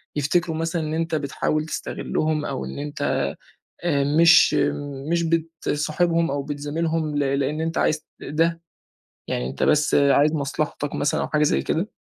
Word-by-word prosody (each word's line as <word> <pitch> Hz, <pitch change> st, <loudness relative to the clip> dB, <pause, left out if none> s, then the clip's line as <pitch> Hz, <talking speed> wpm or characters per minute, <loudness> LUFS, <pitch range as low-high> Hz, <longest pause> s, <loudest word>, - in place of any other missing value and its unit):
يفتكروا 160 Hz, +3 st, 0 dB
مثلًا 165 Hz, 0 st, -1 dB
إن 155 Hz, 0 st, -3 dB
أنت 165 Hz, 0 st, -1 dB
بتحاول 150 Hz, +1 st, -1 dB
تستغلّهم 155 Hz, -1 st, -2 dB
أو 65 Hz, -, -3 dB
إن 65 Hz, -, -7 dB
أنت 145 Hz, 0 st, -1 dB, 0.6 s
آآ 145 Hz, -5 st, +2 dB
مش 165 Hz, +3 st, +6 dB, 0.6 s
مش 170 Hz, 0 st, +2 dB
بتصاحبهم 165 Hz, 0 st, 0 dB
أو 140 Hz, 0 st, -1 dB
بتزاملهم 150 Hz, +2 st, -2 dB
ل 140 Hz, -1 st, +1 dB
لإن 145 Hz, +3 st, -1 dB
أنت 165 Hz, 0 st, -1 dB
عايز 155 Hz, -, +2 dB
ت -, -, -40 dB, 0.2 s
ده، 165 Hz, +3 st, 0 dB, 0.7 s
يعني 60 Hz, -, -2 dB
أنت 65 Hz, -, -6 dB
بس 150 Hz, -1 st, +3 dB
عايز 145 Hz, +1 st, +4 dB
مصلحتك 145 Hz, 0 st, -2 dB
مثلًا 145 Hz, -, 0 dB
أو -, -, -2 dB
حاجة 150 Hz, -1 st, +1 dB
زي 150 Hz, -, +2 dB
كده؟ 175 Hz, +6 st, -1 dB
155 Hz, 155 wpm, -23 LUFS, 145-165 Hz, 0.7 s, مش